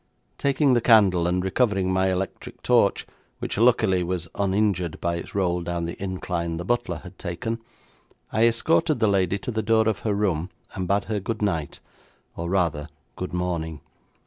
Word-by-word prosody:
Taking 140 -1 +3
the 120 - +3
candle, 100 -7 +5
and 90 +1 0
recovering 95 -2 +1
my 95 0 +2
electric 95 +1 -5
torch, - - +3 0.3
which - - -3
luckily 110 -6 +4
was 90 -1 -2
uninjured 95 -4 0
by 85 0 -1
its 85 - -8
roll 90 -3 +1
down 85 0 -3
the 85 - -6
incline 90 -3 -3
the 85 - -5
butler 120 -6 -1
had 95 0 -12
taken, 105 +6 -3 0.7
I 110 +2 +5
escorted 150 +5 +2
the 110 - +3
lady 95 -1 +2
to 110 - -5
the 110 -1 -1
door 110 0 +3
of 110 -3 0
her 105 -2 -1
room, 95 -4 0 0.2
and 95 -1 -3
bade 100 +3 +2
her 110 -2 -2
good 110 +2 -3
night, 85 -7 -2 0.5
or 85 +1 -4
rather, 85 -5 0 0.3
good 90 - -5
morning. 85 -4 -3
95 Hz, 170 wpm, -25 LUFS, 85-110 Hz, 0.7 s, candle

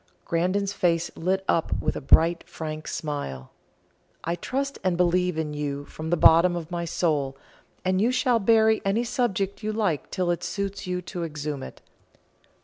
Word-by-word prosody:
Grandon's 185 +4 0
face 170 -3 0
lit 190 +3 -1
up 165 - +1
with - - -1
a - - -4
bright 165 +5 +4
frank 155 -1 -6
smile. 70 - -4 0.7
"I 170 - -1
trust 275 +10 -3
and 185 -2 +1
believe 180 -1 +2
in 155 -2 -2
you 145 -1 -3
from 155 +2 -7
the 175 - +2
bottom 170 +3 +6
of 170 0 -6
my 170 -1 -2
soul, 150 -5 0 0.5
and 185 +1 +2
you 235 +4 +3
shall 250 -2 +2
bury 220 +1 +4
any 200 +4 +1
subject 210 -5 -1
you 215 0 -2
like 205 -9 -1
till 180 -2 0
it 175 - -2
suits 200 -1 -3
you 180 0 -2
to 175 0 -5
exhume 150 -3 -4
it. - - -9
175 Hz, 170 wpm, -26 LUFS, 160-200 Hz, 0.7 s, bottom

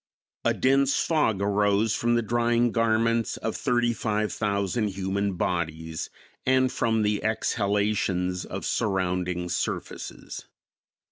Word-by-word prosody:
A - - +2
dense 135 +1 +3
fog 115 - +1
arose 105 +1 +2
from 120 0 +1
the 120 - +1
drying 120 +1 +2
garments 115 0 +1
of - - -3
thirty 120 -1 +1
five 110 -1 -1
thousand 100 +1 0
human 100 +1 -2
bodies 80 -2 -2 0.3
and 130 0 +3
from 110 -3 +1
the 105 0 0
exhalations 100 -4 0
of - - -6
surrounding 90 -4 -1
surfaces. - - -4
105 Hz, 115 wpm, -26 LUFS, 95-115 Hz, 0.3 s, dense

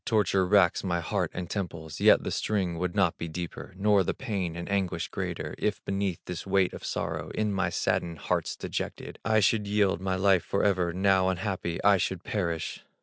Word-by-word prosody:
Torture 100 -4 +2
racks 95 -3 +4
my 85 -3 0
heart 85 - -1
and 90 - -5
temples, 85 -5 -5
Yet - - +6
the - - -3
sting 95 -6 -1
would 90 +1 -2
not 95 -5 +2
be 85 - -3
deeper, 85 +3 -6
Nor 100 -1 +4
the - - -2
pain 95 -9 -3
and 85 0 -5
anguish 100 -2 -1
greater, - - -4
If 105 -1 -1
beneath 100 -3 -1
this 90 +1 -6
weight 95 -1 +2
of - - -8
sorrow, - - -3
In 105 -1 0
my 95 -1 +1
saddened 85 -1 -1
heart's - - -1
dejection, - - -5
I 110 -1 +3
should 105 +1 +2
yield 100 -3 +2
my 95 0 0
life 95 -1 +3
forever, 95 -3 +1
Now 95 +1 +3
unhappy, 95 -3 -2
I 100 -1 +6
should 90 0 -2
perish! 85 -6 -2
95 Hz, 190 wpm, -28 LUFS, 85-100 Hz, -, Yet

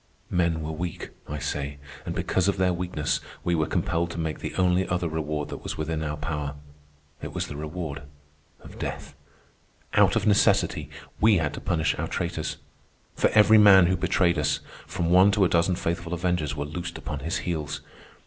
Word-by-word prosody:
Men 85 -2 +1
were 80 - -3
weak, 85 +2 -5 0.2
I 75 - -3
say, 70 0 -3 0.3
and - - -3
because 95 0 0
of 100 - +1
their 90 -1 +2
weakness 85 -4 -1 0.2
we 85 - +1
were 80 -3 +1
compelled 85 +1 0
to 85 - -7
make 80 -2 -3
the - - -5
only 90 0 +2
other 90 -1 -1
reward 75 -2 -3
that - - -7
was - - -5
within 80 0 -2
our 75 -1 -3
power. 75 -3 -3 0.7
It - - -6
was - - -2
the 75 - -7
reward 75 -1 -5 0.6
of - - -12
death. - - -5 0.8
Out - - +5
of - - +1
necessity 105 -1 +3 0.3
we 110 -2 +5
had 75 -3 -1
to - - -7
punish 80 -3 +1
our - - -1
traitors. 85 -3 -3 0.6
For - - +3
every 110 0 +7
man 95 -3 +8
who 95 +2 +2
betrayed 90 -2 +2
us, 75 0 +1 0.3
from 85 0 -1
one 95 +2 +7
to 100 -2 +4
a - - +2
dozen 85 +2 +2
faithful 85 0 -2
avengers 85 -4 -1
were 70 -1 -3
loosed 85 +3 -5
upon 75 - -5
his 80 +4 -2
heels. 75 -4 -3
85 Hz, 185 wpm, -26 LUFS, 75-90 Hz, 0.8 s, man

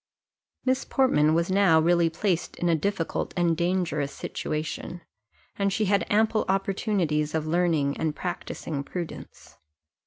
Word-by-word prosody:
Miss 260 0 +1
Portman 160 - +3
was 170 +2 +1
now 190 -4 +5
really 170 +1 +3
placed 175 +1 -1
in 175 - -1
a - - +4
difficult 165 +1 -2
and 170 -2 +2
dangerous 170 -5 0
situation, 160 +3 -4 0.6
and 200 0 +2
she 215 +2 0
had 200 0 +1
ample 220 +1 +2
opportunities 190 -6 0
of 155 -1 -1
learning 160 -4 +1
and 155 -2 -1
practising 160 -4 -4
prudence. 170 +3 -8
175 Hz, 130 wpm, -26 LUFS, 160-195 Hz, 0.6 s, now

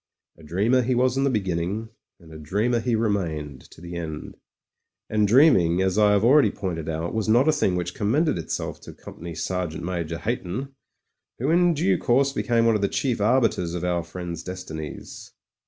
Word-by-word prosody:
A - - -19
dreamer 100 +11 +1
he 125 +1 0
was 125 +1 +2
in 135 +1 +1
the - - +3
beginning, 100 0 -2 0.3
and 80 -3 -15
a 80 - -9
dreamer 105 +10 0
he 120 0 0
remained 85 - -2
to - - -16
the 85 0 -8
end. 80 -3 -6 0.8
And 105 -1 +2
dreaming, 100 - +5
as 95 -1 0
I 105 -1 +4
have 100 0 +2
already 130 -1 +5
pointed 85 -6 -4
out, 80 +2 -3
was 110 -1 -1
not 120 +6 +4
a - - +6
thing 125 -12 +1
which 90 -1 -3
commended 125 - +1
itself 80 - -4
to - - -11
Company 85 -1 -10
Sergeant 85 -1 -3
Major 85 -2 -3
Hayton, 120 +5 -4 0.6
who 135 +6 0
in 175 0 +4
due 170 +6 +1
course 135 +2 +2
became 115 -4 +1
one 115 - +4
of 105 - 0
the 100 - +2
chief 125 -6 -1
arbiters 110 -7 +1
of 90 - -4
our 90 -1 0
friend's 85 -1 -6
destinies. 90 -5 -8
100 Hz, 190 wpm, -24 LUFS, 85-120 Hz, 0.8 s, a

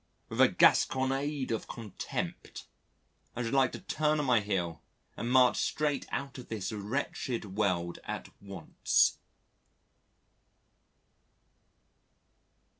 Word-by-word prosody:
With - - 0
a - - +9
gasconnade 135 +1 +2
of 115 - -2
contempt, 110 -5 -6 0.7
I 125 - -2
should 115 - -3
like 135 -2 +4
to - - -5
turn 155 0 0
on 145 - 0
my 125 -3 +4
heel 90 -6 -2 0.3
and 120 - -3
march 125 -1 +5
straight 150 -2 0
out 140 -1 -4
of 125 - -10
this 110 -2 -3
wretched 110 -1 -3
world 90 -5 0
at - - -5
once. 100 -4 +1
120 Hz, 110 wpm, -31 LUFS, 100-135 Hz, 0.7 s, a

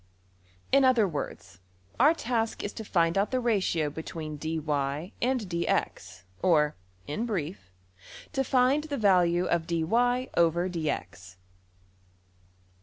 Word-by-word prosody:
In 275 0 +5
other 250 -5 +4
words 145 - -6 0.4
our 295 +6 +6
task 230 -5 -2
is 205 - -4
to 220 - -6
find 170 -2 +1
out 200 - +1
the 255 - 0
ratio 190 -10 0
between 160 0 -6
$dy$~and~$dx$, 160 - -2 0.2
or, 150 -4 +3 0.3
in 215 +12 -3
brief, 175 - -4 0.6
to 270 -2 +1
find 265 +3 +2
the 290 -2 -3
value 180 -4 +3
of~$\dfrac{dy}{dx}$. 170 - 0
175 Hz, 100 wpm, -28 LUFS, 155-240 Hz, 0.6 s, our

